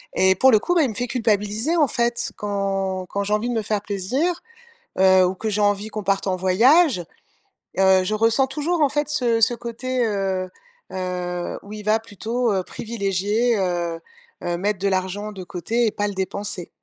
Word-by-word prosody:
et 190 Hz, 0 st, +5 dB
pour 265 Hz, +8 st, +5 dB
le 215 Hz, -, +6 dB
coup, 355 Hz, -, -1 dB
ben 330 Hz, -, +5 dB
il 260 Hz, -, +1 dB
me -, -, -7 dB
fait 245 Hz, +2 st, -2 dB
culpabiliser, 220 Hz, -, 0 dB
en 305 Hz, -4 st, +4 dB
fait. 235 Hz, 0 st, -1 dB
Quand 195 Hz, -2 st, -2 dB
quand 200 Hz, 0 st, -2 dB
j'ai 210 Hz, -, -1 dB
envie 220 Hz, +3 st, 0 dB
de -, -, -1 dB
me 225 Hz, -, 0 dB
faire 210 Hz, 0 st, -1 dB
plaisir, 255 Hz, -, -1 dB, 0.6 s
heu, 190 Hz, -1 st, +6 dB
ou 185 Hz, -, -1 dB
que 220 Hz, +4 st, -4 dB
j'ai 210 Hz, 0 st, -1 dB
envie 205 Hz, +1 st, +1 dB
qu'on 215 Hz, -2 st, -6 dB
parte 195 Hz, 0 st, 0 dB
en 185 Hz, -, +1 dB
voyage, 235 Hz, -, +4 dB, 0.8 s
heu, 190 Hz, -1 st, +5 dB
je 200 Hz, -, -1 dB
ressens 225 Hz, +5 st, +3 dB
toujours 305 Hz, +5 st, -1 dB
en 280 Hz, -, +4 dB
fait 295 Hz, +1 st, -1 dB
ce 235 Hz, -5 st, +1 dB
ce 240 Hz, +2 st, +4 dB
côté, 240 Hz, +1 st, -2 dB
heu 190 Hz, -3 st, -1 dB, 0.4 s
heu, 180 Hz, -1 st, -3 dB
où 205 Hz, +1 st, -10 dB
il 210 Hz, -1 st, -7 dB
va 215 Hz, +1 st, +3 dB
plutôt, 225 Hz, +2 st, -2 dB
heu, 190 Hz, -, +1 dB
privilégier, 215 Hz, +2 st, -1 dB
heu 175 Hz, -3 st, -1 dB, 0.4 s
heu, 175 Hz, 0 st, -1 dB
mettre 205 Hz, +2 st, -1 dB
de 200 Hz, -, 0 dB
l'argent 190 Hz, +2 st, -2 dB
de 190 Hz, -3 st, -8 dB
côté 220 Hz, +7 st, -1 dB
et -, -, 0 dB
pas 205 Hz, 0 st, -1 dB
le 205 Hz, -, -4 dB
dépenser. 190 Hz, -1 st, -4 dB
205 Hz, 200 wpm, -22 LUFS, 190-235 Hz, 0.8 s, le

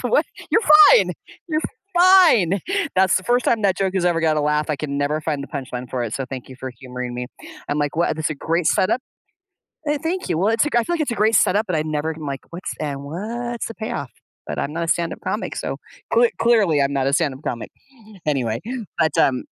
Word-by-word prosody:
For -, -, -2 dB
what? -, -, +4 dB, 0.2 s
You're 440 Hz, -, +3 dB, 0.3 s
fine. -, -, +5 dB, 0.4 s
You're 310 Hz, -1 st, 0 dB, 0.4 s
fine." 330 Hz, -, +6 dB, 0.3 s
That's 190 Hz, -1 st, +4 dB
the 185 Hz, -, -2 dB
first 245 Hz, 0 st, +2 dB
time 225 Hz, -2 st, +2 dB
that 190 Hz, -2 st, +2 dB
joke 195 Hz, -1 st, -1 dB
has 180 Hz, -2 st, 0 dB
ever 170 Hz, -2 st, +2 dB
got 155 Hz, -1 st, +2 dB
a 150 Hz, -, +2 dB
laugh. 150 Hz, +1 st, 0 dB
I 150 Hz, -, 0 dB
can 140 Hz, -1 st, -4 dB
never 145 Hz, +2 st, 0 dB
find 150 Hz, -3 st, -2 dB
the -, -, -9 dB
punchline 125 Hz, -3 st, -6 dB
for 125 Hz, -2 st, -2 dB
it, 110 Hz, -, -4 dB
so 135 Hz, -, -2 dB
thank 130 Hz, -1 st, -8 dB
you 130 Hz, -, -10 dB
for 130 Hz, 0 st, -5 dB
humoring 125 Hz, -1 st, -6 dB
me. 125 Hz, 0 st, -4 dB, 0.4 s
I'm 145 Hz, -, -1 dB
like, 145 Hz, +1 st, -1 dB
"What 170 Hz, -1 st, +1 dB
this 155 Hz, -, -1 dB
is -, -, -1 dB
a -, -, -2 dB
great 165 Hz, +3 st, -1 dB
setup." 215 Hz, +7 st, +2 dB, 0.9 s
Eh, 295 Hz, -1 st, +1 dB
thank 365 Hz, +3 st, -2 dB
you. 160 Hz, -, +1 dB
Well, 200 Hz, +4 st, +2 dB
it's 225 Hz, +2 st, +3 dB
lik 295 Hz, -, -2 dB
I 240 Hz, -, +4 dB
feel 345 Hz, -, -2 dB
like 320 Hz, -, -1 dB
it's 280 Hz, -, -1 dB
a -, -, -2 dB
great 215 Hz, +2 st, +3 dB
setup, 210 Hz, +2 st, +3 dB
but 180 Hz, -, -1 dB
I 155 Hz, -, +1 dB
never 155 Hz, +1 st, -2 dB
like, 140 Hz, -3 st, -5 dB
what's 175 Hz, +2 st, -6 dB
and 140 Hz, -2 st, -4 dB
what's 230 Hz, +10 st, -4 dB
the 230 Hz, -, -9 dB
payoff? 180 Hz, -, -5 dB, 0.4 s
But -, -, -4 dB
I'm 150 Hz, -, -3 dB
not 170 Hz, +1 st, -2 dB
a -, -, -3 dB
stand-up 170 Hz, 0 st, 0 dB
comic, -, -, -3 dB
so -, -, -4 dB, 0.4 s
cle 480 Hz, 0 st, +5 dB
clearly 205 Hz, -11 st, +3 dB
I'm 140 Hz, 0 st, +1 dB
not 135 Hz, -1 st, 0 dB
a 140 Hz, -, 0 dB
stand-up 140 Hz, -1 st, 0 dB
comic. 120 Hz, -, -4 dB, 0.6 s
Anyway, 125 Hz, -7 st, -1 dB, 0.4 s
but, 160 Hz, -1 st, +2 dB
um 130 Hz, -2 st, +2 dB
160 Hz, 240 wpm, -21 LUFS, 140-220 Hz, 0.9 s, fine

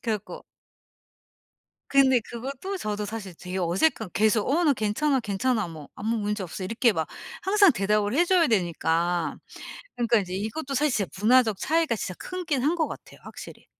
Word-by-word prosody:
그래 230 Hz, -, -1 dB
갖고 210 Hz, -, -11 dB, 1.5 s
근데 265 Hz, -2 st, +5 dB
그것도 270 Hz, -, -6 dB
저도 210 Hz, -4 st, -3 dB
사실 205 Hz, -3 st, -6 dB
되게 180 Hz, +1 st, -5 dB
어색한 190 Hz, -, +1 dB
계속 215 Hz, 0 st, +2 dB
"어 335 Hz, +6 st, +2 dB
나 295 Hz, -, +5 dB
괜찮아, 260 Hz, +5 st, 0 dB
괜찮아." 215 Hz, 0 st, -1 dB
뭐 155 Hz, -3 st, -10 dB
"아무 225 Hz, +3 st, -2 dB
문제 210 Hz, -1 st, -2 dB
없어." 185 Hz, +1 st, -6 dB
이렇게 230 Hz, +4 st, +2 dB
막 160 Hz, -5 st, -2 dB, 0.4 s
항상 400 Hz, -1 st, +5 dB
대답을 210 Hz, 0 st, 0 dB
해 340 Hz, +5 st, +4 dB
줘야 355 Hz, -2 st, +4 dB
되니까 175 Hz, -, 0 dB, 0.6 s
그니까 235 Hz, -1 st, +3 dB
이제 185 Hz, -3 st, -4 dB
이것도 220 Hz, +9 st, -4 dB
사실 295 Hz, +3 st, +2 dB, 0.2 s
진짜 -, -, -24 dB
문화적 225 Hz, -1 st, +4 dB
차이가 320 Hz, -1 st, +1 dB
진짜 185 Hz, -3 st, -4 dB
크긴 340 Hz, -8 st, -3 dB
한 290 Hz, -, +3 dB
거 315 Hz, -, +3 dB
같아요 -, -, -10 dB
확실히. -, -, -11 dB
225 Hz, 350 characters per minute, -26 LUFS, 195-275 Hz, 1.5 s, 근데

